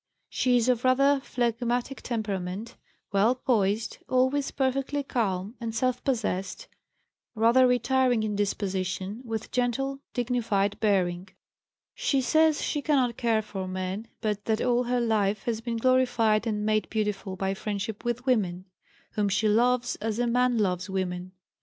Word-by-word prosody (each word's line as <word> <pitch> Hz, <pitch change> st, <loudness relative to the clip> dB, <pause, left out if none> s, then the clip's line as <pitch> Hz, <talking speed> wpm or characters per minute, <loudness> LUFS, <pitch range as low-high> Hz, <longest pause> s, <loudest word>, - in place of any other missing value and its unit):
She 250 Hz, -1 st, +2 dB
is 240 Hz, 0 st, +1 dB
of 245 Hz, -2 st, +2 dB
rather 275 Hz, +2 st, +4 dB
phlegmatic 245 Hz, +1 st, -1 dB
temperament, 210 Hz, -1 st, -4 dB, 0.4 s
well 205 Hz, +5 st, +3 dB
poised, 220 Hz, -4 st, 0 dB
always 260 Hz, +2 st, +2 dB
perfectly 275 Hz, +1 st, -1 dB
calm 205 Hz, -6 st, -2 dB
and 225 Hz, -1 st, -4 dB
self 250 Hz, +1 st, 0 dB
possessed, 230 Hz, -, -2 dB, 0.7 s
rather 235 Hz, +4 st, +5 dB
retiring 250 Hz, -2 st, +2 dB
in 210 Hz, -1 st, -2 dB
disposition, 195 Hz, +1 st, -2 dB
with 225 Hz, -2 st, -5 dB
gentle, 270 Hz, +3 st, -1 dB, 0.2 s
dignified 225 Hz, -5 st, 0 dB
bearing. 185 Hz, -4 st, +1 dB, 0.7 s
She 275 Hz, -, +1 dB
says 315 Hz, +4 st, +3 dB
she 295 Hz, -, -1 dB
cannot 265 Hz, -6 st, +2 dB
care 225 Hz, -3 st, +1 dB
for 195 Hz, -3 st, -5 dB
men, 185 Hz, +4 st, -4 dB
but 210 Hz, -2 st, -2 dB
that 220 Hz, -1 st, +1 dB
all 245 Hz, 0 st, +1 dB
her 245 Hz, +1 st, +1 dB
life 215 Hz, -3 st, +1 dB
has 225 Hz, -2 st, -2 dB
been 230 Hz, 0 st, -3 dB
"glorified 230 Hz, -3 st, +2 dB
and 210 Hz, -1 st, -1 dB
made 215 Hz, 0 st, +1 dB
beautiful 210 Hz, -3 st, -2 dB
by 190 Hz, +1 st, -1 dB
friendship 205 Hz, +2 st, -4 dB
with 240 Hz, +1 st, -2 dB
women," 190 Hz, -8 st, 0 dB, 0.5 s
whom 205 Hz, -1 st, 0 dB
she 195 Hz, +3 st, +1 dB
loves 240 Hz, +3 st, +2 dB
as 220 Hz, 0 st, -3 dB
a 245 Hz, -, +1 dB
man 245 Hz, 0 st, +2 dB
loves 185 Hz, -2 st, 0 dB
women. 185 Hz, -1 st, -3 dB
225 Hz, 145 wpm, -27 LUFS, 200-250 Hz, 0.7 s, rather